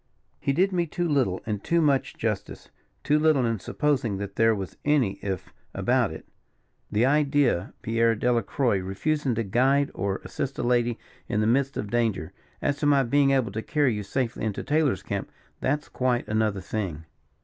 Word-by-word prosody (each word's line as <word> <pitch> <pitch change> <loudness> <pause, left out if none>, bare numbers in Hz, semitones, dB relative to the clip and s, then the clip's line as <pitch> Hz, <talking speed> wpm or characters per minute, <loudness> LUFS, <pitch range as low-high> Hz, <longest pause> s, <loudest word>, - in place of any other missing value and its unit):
"He - - 0
did 185 +8 +2
me 175 -2 0
too 175 +2 -2
little 130 - +1
and 105 -2 -3
too 170 - +2
much 145 -4 +1
justice. 105 -3 -4 0.3
Too 150 +1 +3
little, 155 -5 +3
in 115 -2 0
supposing 130 -5 0
that 100 0 -6
there 115 0 +4
was 95 -3 -6
any 140 -9 +2
if 95 -2 -4 0.2
about - - +2
it. - - -9 0.6
The 110 +4 +3
idea 145 - +3 0.2
of - - -40
Pierre 115 0 +2
Delacroix 120 -1 +1
refusing 125 +8 -1
to 115 - 0
guide 135 +7 +2
or 100 0 -2
assist 140 -2 -4
a - - -2
lady 120 -1 +2 0.3
in 105 - 0
the 110 - +2
midst 135 +5 +1
of 105 - -4
danger. 105 -8 0 0.3
As 145 0 +1
to 145 - 0
my 140 -2 +5
being 140 +3 +3
able 130 -6 +2
to 110 - -3
carry 145 -1 +1
you 105 - -3
safely 115 +4 -2
into 110 -3 -2
Taylor's 145 - +1
camp, - - -4 0.3
that's 145 +3 -1
quite 125 -1 0
another 110 -2 0
thing." 90 -6 -4
120 Hz, 180 wpm, -26 LUFS, 105-140 Hz, 0.6 s, my